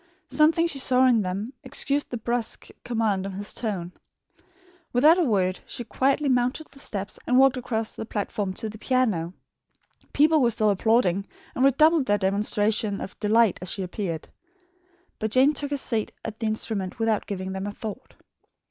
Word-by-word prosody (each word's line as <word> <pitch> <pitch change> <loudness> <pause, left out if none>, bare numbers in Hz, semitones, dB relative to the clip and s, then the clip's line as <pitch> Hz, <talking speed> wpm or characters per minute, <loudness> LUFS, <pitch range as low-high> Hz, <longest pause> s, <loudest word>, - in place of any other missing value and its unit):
Something 320 +2 +3
she 290 -5 -3
saw 260 0 +3
in 240 -4 +4
them 200 +6 -4
excused 285 +1 -1
the 245 - -3
brusque 235 0 -2
command 220 -5 0
of 195 - -6
his 205 +1 -4
tone. 195 -7 -3 1.0
Without 305 +8 +6
a - - +4
word, 190 - +1
she 240 - -4
quietly 275 +5 +1
mounted 250 +4 +1
the 275 - -15
steps 200 -5 -5
and 250 - +3
walked 270 0 +6
across 225 -3 -2
the 220 - -7
platform 205 -2 -2
to 220 - -3
the 215 0 -9
piano. 215 -10 0 0.8
People 310 +1 +4
were 240 - +4
still 215 -2 +2
applauding, 200 -2 +2 0.3
and 255 - 0
redoubled 305 +2 +4
their 205 - +3
demonstrations 205 +1 +1
of - - -8
delight 220 -1 +3
as 185 - -3
she 195 - -2
appeared; 180 -3 -4 0.9
but 220 - -1
Jane 260 +6 +4
took 285 0 -3
her 285 - -1
seat 225 -5 -1
at 220 -1 -6
the 225 - -1
instrument 215 -3 -3
without 225 -2 0
giving 190 -1 -4
them 190 +1 -4
a - - -3
thought. 215 0 -8
220 Hz, 175 wpm, -25 LUFS, 200-255 Hz, 1.0 s, Without